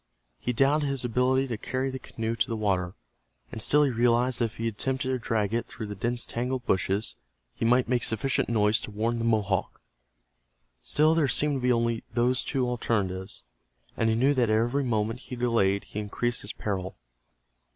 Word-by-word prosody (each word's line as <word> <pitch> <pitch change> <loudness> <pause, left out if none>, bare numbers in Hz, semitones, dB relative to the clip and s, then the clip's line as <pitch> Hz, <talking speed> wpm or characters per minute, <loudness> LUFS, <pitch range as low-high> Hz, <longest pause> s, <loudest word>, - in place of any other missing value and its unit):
He 125 - -1
doubted 140 +5 +2
his 135 -2 -1
ability 125 +3 +2
to 115 -3 -3
carry 130 +1 -2
the 130 - -5
canoe 115 -2 -4
to 115 - 0
the 115 - -2
water, 95 -4 -1 0.6
and 110 - -3
still 150 +6 +5
he 140 - +2
realized 120 +1 +2
that 120 - +3
if 115 - -7
he 115 - -2
attempted 130 +4 -2
to 130 -1 0
drag 110 -3 -1
it 115 - -1
through 110 - -7
the 105 - -6
dense 120 +4 -2
tangle 125 +2 -2
of 120 - -16
bushes 95 +3 0 0.4
he - - -3
might 125 +2 +3
make 125 0 +1
sufficient 110 +4 0
noise 105 -1 +3
to - - -6
warn 115 +3 -1
the 115 - -1
Mohawk. 105 -4 0 1.0
Still 155 - +3
there 165 -3 +2
seemed 145 +1 +3
to - - -5
be 125 0 +2
only 115 -1 0
those 125 +1 +1
two 130 -3 -1
alternatives, 100 -6 -2 0.5
and 115 - +1
he 110 - +2
knew 135 +5 +3
that 125 -5 +2
every 120 +6 +2
moment 115 -1 -1
he 125 - -8
delayed 115 -5 +1
he 105 - -6
increased 120 +3 -2
his - - -6
peril. 95 - -4
115 Hz, 195 wpm, -27 LUFS, 110-130 Hz, 1.0 s, still